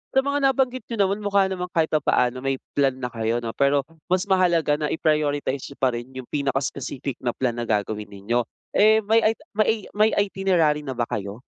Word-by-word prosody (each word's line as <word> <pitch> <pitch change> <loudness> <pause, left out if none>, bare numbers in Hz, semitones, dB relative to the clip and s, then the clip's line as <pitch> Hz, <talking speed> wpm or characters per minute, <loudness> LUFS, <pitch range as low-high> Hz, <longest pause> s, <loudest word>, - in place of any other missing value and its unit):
sa 265 - +5
mga 280 -1 +2
nabanggit 255 -2 0
n'yo 230 - -3
naman, 200 +2 -1
mukha 200 -1 +3
namang 180 -1 -3
kahit 165 -2 0
papaano 130 -4 +2
may 135 0 -1 0.2
plan 135 -2 +2
na 130 -1 -3
kayo 115 +1 0
'no, 115 -1 -4
pero 140 0 +2 0.2
mas 185 0 +2
mahalaga 170 -6 +2
na 150 - 0
i-prioritize 145 -4 0
n'yo 140 - -13
pa 130 -2 +1
rin 120 +2 -5
yung 130 - -6
pinaka-specific 135 -2 -3
na 120 -2 -1
plan 125 -3 0
na 120 -1 -5
gagawin 105 0 -1
ninyo, 105 +5 -1 0.3
eh, 215 +1 +6
may 225 +2 +4
ita 225 +6 0
may 215 0 +2
ei 225 - +2 0.2
may 215 +1 +4
itinerary 185 -7 +2
na 130 -4 -6
ba 120 - +1
kayo? 105 -3 -5
145 Hz, 205 wpm, -24 LUFS, 125-195 Hz, 0.3 s, eh